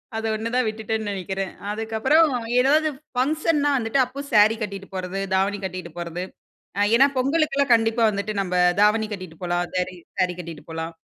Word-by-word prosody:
அத 225 Hz, -, -3 dB
ஒண்ணு 220 Hz, +1 st, -3 dB
தான் 255 Hz, -2 st, +2 dB
விட்டுட்டேன்ன்னு 220 Hz, -1 st, -3 dB
நெனைக்கிறேன். 190 Hz, 0 st, -4 dB, 0.2 s
அதுக்கப்பறம் 225 Hz, +9 st, +2 dB, 0.3 s
ஏதாவது 305 Hz, +4 st, +3 dB, 0.3 s
ஃபங்ஷன்னா 295 Hz, +2 st, +1 dB
வந்துட்டு 230 Hz, +2 st, 0 dB
அப்போ 255 Hz, +3 st, -9 dB
சாரி 215 Hz, +1 st, +6 dB
கட்டிட்டு 200 Hz, -2 st, -5 dB
போறது, 185 Hz, +1 st, -4 dB
தாவணி 195 Hz, +2 st, +1 dB
கட்டிட்டு 185 Hz, -2 st, -6 dB
போறது. 175 Hz, +1 st, -4 dB, 0.5 s
அ 205 Hz, -, +2 dB
ஏன்னா 270 Hz, +3 st, +6 dB
பொங்கலுக்குல்லாம் 280 Hz, -1 st, +2 dB
கண்டிப்பா 225 Hz, 0 st, +2 dB
வந்துட்டு 200 Hz, +1 st, -3 dB
நம்ப 180 Hz, -2 st, -3 dB, 0.3 s
தாவணி 215 Hz, +1 st, +3 dB
கட்டிட்டு 185 Hz, -5 st, -8 dB
போலாம். 175 Hz, 0 st, -1 dB
சாரி 185 Hz, 0 st, -1 dB, 0.2 s
சாரி 180 Hz, -1 st, +2 dB
கட்டிட்டு 165 Hz, -3 st, -8 dB
போலாம். 160 Hz, 0 st, -5 dB
215 Hz, 155 wpm, -23 LUFS, 185-250 Hz, 0.5 s, சாரி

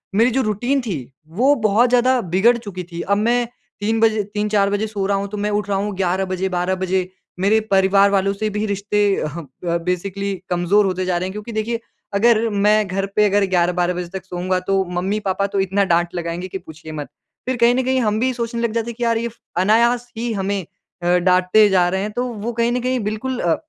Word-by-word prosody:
मेरी 230 Hz, +4 st, +4 dB
जो 265 Hz, +2 st, +1 dB
रूटीन 245 Hz, +6 st, 0 dB
थी, 155 Hz, -, -5 dB, 0.2 s
वो 245 Hz, -, +3 dB
बहुत 220 Hz, +1 st, +3 dB
ज़्यादा 250 Hz, +1 st, +3 dB
बिगड़ 190 Hz, +7 st, +3 dB
चुकी 200 Hz, -6 st, -7 dB
थी। 170 Hz, -, -5 dB
अब 200 Hz, +3 st, +1 dB
मैं 240 Hz, +2 st, +1 dB, 0.3 s
3 220 Hz, +2 st, 0 dB
बजे 220 Hz, -2 st, +3 dB
3-4 210 Hz, -1 st, +1 dB
बजे 205 Hz, +2 st, -1 dB
सो 200 Hz, -2 st, -3 dB
रहा 200 Hz, 0 st, +1 dB
हूँ 200 Hz, -, -3 dB
तो 210 Hz, -, -6 dB
मैं 205 Hz, +1 st, -1 dB
उठ 205 Hz, 0 st, -1 dB
रहा 195 Hz, -, +1 dB
हूँ 200 Hz, 0 st, -2 dB
11 190 Hz, 0 st, 0 dB
बजे, 185 Hz, 0 st, -2 dB
12 180 Hz, +1 st, 0 dB
बजे। 185 Hz, 0 st, -1 dB, 0.3 s
मेरे 205 Hz, +4 st, +3 dB
परिवार 195 Hz, +1 st, +5 dB
वालों 195 Hz, 0 st, +2 dB
से 215 Hz, +2 st, -2 dB
भी 210 Hz, +1 st, -2 dB
रिश्ते 205 Hz, 0 st, 0 dB, 0.2 s
अह 150 Hz, +2 st, -4 dB, 0.2 s
ब 170 Hz, -1 st, 0 dB
बेसिकली 195 Hz, +2 st, -2 dB, 0.2 s
कमज़ोर 180 Hz, +4 st, +2 dB
होते 185 Hz, -1 st, -1 dB
जा 180 Hz, -1 st, 0 dB
रहे 185 Hz, -, -2 dB
हैं 190 Hz, -, -5 dB
क्योंकि 210 Hz, +2 st, -7 dB
देखिए 225 Hz, +1 st, -2 dB, 0.4 s
अगर 225 Hz, +2 st, +4 dB
मैं 210 Hz, 0 st, +2 dB
घर 195 Hz, +1 st, -1 dB
पे 210 Hz, -, +4 dB
अगर 200 Hz, 0 st, +3 dB
11-12 180 Hz, 0 st, +1 dB
बजे 175 Hz, -1 st, -5 dB
तक 190 Hz, -1 st, -6 dB
सोऊँगा 185 Hz, 0 st, -1 dB
तो 195 Hz, -1 st, +2 dB, 0.2 s
मम्मी-पापा 200 Hz, 0 st, -1 dB
तो 200 Hz, 0 st, -2 dB
इतना 195 Hz, +1 st, +1 dB
डाँट 175 Hz, 0 st, +1 dB
लगाएँगे 170 Hz, +1 st, -3 dB
कि 190 Hz, -, -5 dB
पूछिए 160 Hz, -2 st, -11 dB
मत। 145 Hz, -2 st, -6 dB, 0.4 s
फिर 255 Hz, -1 st, 0 dB
कहीं 235 Hz, +1 st, +4 dB
न 260 Hz, -, +1 dB
कहीं 260 Hz, 0 st, +2 dB
हम 215 Hz, -1 st, +1 dB
भी 260 Hz, +2 st, +1 dB
सोचने 235 Hz, -1 st, -3 dB
लग 235 Hz, -2 st, 0 dB
जाते 230 Hz, 0 st, -1 dB
हैं -, -, -11 dB
कि 240 Hz, -, -3 dB
यार 230 Hz, -1 st, +2 dB
ये 235 Hz, -, -2 dB
फ़ 230 Hz, -, -20 dB, 0.2 s
अनायास 235 Hz, +4 st, +3 dB
ही 235 Hz, 0 st, -2 dB
हमें 195 Hz, -1 st, -2 dB, 0.4 s
अ, -, -, 0 dB
डाँटते 185 Hz, +4 st, +4 dB
जा 180 Hz, -2 st, +3 dB
रहे 190 Hz, +1 st, -1 dB
हैं। 210 Hz, +1 st, -3 dB
तो 245 Hz, +4 st, -2 dB
वो 235 Hz, -1 st, -4 dB
कहीं 235 Hz, +1 st, +1 dB
ना 250 Hz, -, 0 dB
कहीं 255 Hz, 0 st, 0 dB
बिल्कुल 230 Hz, +5 st, -3 dB
अ, 170 Hz, -2 st, +2 dB
200 Hz, 230 wpm, -20 LUFS, 185-225 Hz, 0.4 s, परिवार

